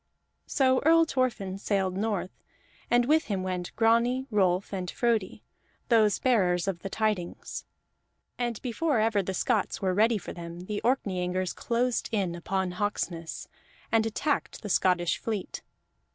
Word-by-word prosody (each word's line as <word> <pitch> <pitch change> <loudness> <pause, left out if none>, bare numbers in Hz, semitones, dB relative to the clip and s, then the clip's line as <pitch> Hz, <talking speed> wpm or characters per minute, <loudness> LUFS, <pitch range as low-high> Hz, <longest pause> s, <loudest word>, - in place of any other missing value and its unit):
So 260 -2 +3
Earl 330 +2 +6
Thorfinn 230 -10 -1
sailed 195 -3 0
north, 200 -2 -1 0.6
and 240 0 +4
with 310 +4 +3
him 195 -3 -2
went 180 -1 -3
Grani, 235 +3 +3
Rolf, 190 -2 +1
and 185 -2 -3
Frodi, 230 -4 0 0.5
those 215 -4 +4
bearers 185 -8 +2
of 190 -3 -1
the 195 - -6
tidings. 210 -5 -2 0.7
And 240 -3 -2
before 275 +3 0
ever 215 -2 +2
the 190 0 -4
Scots 220 0 0
were 190 -2 0
ready 220 +3 +3
for 195 - -7
them 170 0 -8
the 205 +3 -4
Orkneyingers 185 -7 0
closed 240 0 0
in 195 -6 0
upon 185 +2 -2
Hawksness, 180 -4 -3 0.4
and 225 -1 +3
attacked 280 +5 -2
the 210 - -5
Scottish 175 -4 +2
fleet. 215 -4 -4
205 Hz, 140 wpm, -28 LUFS, 185-235 Hz, 0.7 s, Earl